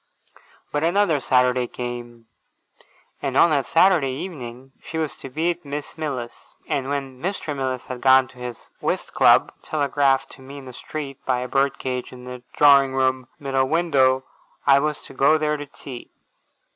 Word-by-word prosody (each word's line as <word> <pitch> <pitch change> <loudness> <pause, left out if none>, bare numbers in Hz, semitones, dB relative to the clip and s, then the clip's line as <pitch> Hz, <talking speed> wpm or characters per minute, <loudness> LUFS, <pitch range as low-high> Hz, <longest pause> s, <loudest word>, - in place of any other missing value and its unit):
But 145 +1 -1
another 175 -2 +3
Saturday 125 -1 +2
came, 120 -1 -7 1.0
and - - -1
on 170 - +6
that 140 -3 +1
Saturday 165 -5 +4
evening 130 -4 -7
she 160 - -6
was 155 -2 -2
to 135 - -9
be 160 +6 0
at 170 - -8
Miss 145 0 -6
Mills's; 135 -7 -6
and 135 -1 -1
when 135 -2 -4
Mr. 175 -5 -3
Mills 130 -2 -3
had 125 -1 -7
gone 130 0 +6
to 130 - -17
his 125 -1 -8
whist - - -2
club - - +5
(telegraphed 140 -2 +1
to 135 - -15
me 135 +2 -10
in 140 - -10
the 130 - -9
street, 140 +1 -7
by 125 -1 0
a 125 - -3
bird 135 +1 +1
cage 125 -1 -4
in 125 -1 -11
the 125 0 -8
drawing 140 -2 +5
room 130 -1 +1
middle 135 -1 0
window), 135 -6 +3 0.4
I 140 0 +6
was 150 +1 -2
to - - -12
go 140 +4 +4
there 150 -1 0
to 145 -1 -6
tea. 130 -3 -10
135 Hz, 175 wpm, -23 LUFS, 130-150 Hz, 1.0 s, on